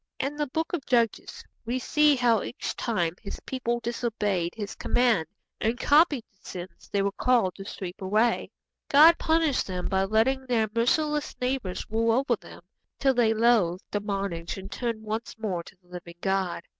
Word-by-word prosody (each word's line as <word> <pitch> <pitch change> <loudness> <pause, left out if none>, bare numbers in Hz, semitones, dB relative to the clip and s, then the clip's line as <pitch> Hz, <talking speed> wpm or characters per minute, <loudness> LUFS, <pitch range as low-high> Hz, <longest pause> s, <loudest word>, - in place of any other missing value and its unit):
In 275 +2 -2
the 295 0 -1
Book 320 +7 -3
of 330 -6 -2
Judges 235 -3 0 0.2
we 235 +2 -2
see 300 +3 +3
how 240 -4 +3
each - - -5
time 175 -8 -1
His 200 - -7
people 240 -2 -2
disobeyed 215 -7 -2
His 205 -3 -5
command 235 -10 +1 0.3
and 225 +2 0
copied 295 -4 +4
the 195 - -36
sins 180 +1 -9
they 200 -1 +1
were 200 - 0
called 230 -4 +2
to 195 - -10
sweep 185 -2 -7
away, 215 +5 +1 0.4
God 315 +4 +7
punished 320 -4 +2
them 180 -1 -3
by 190 0 +1
letting 255 +6 +1
their 225 -3 +2
merciless 295 +6 +1
neighbours 250 -7 -2
rule 225 +1 +1
over 255 0 +2
them, 185 - -14 0.3
till 270 -1 +3
they 235 -3 +3
loathed 215 -6 +3
the 205 - 0
bondage 195 -4 -3
and 195 +2 -9
turned 230 -3 -3
once 220 +2 -4
more 200 -6 -2
to 170 - -15
the 175 - -28
living 175 -1 -10
God. 190 -2 -1
225 Hz, 175 wpm, -27 LUFS, 195-255 Hz, 0.4 s, God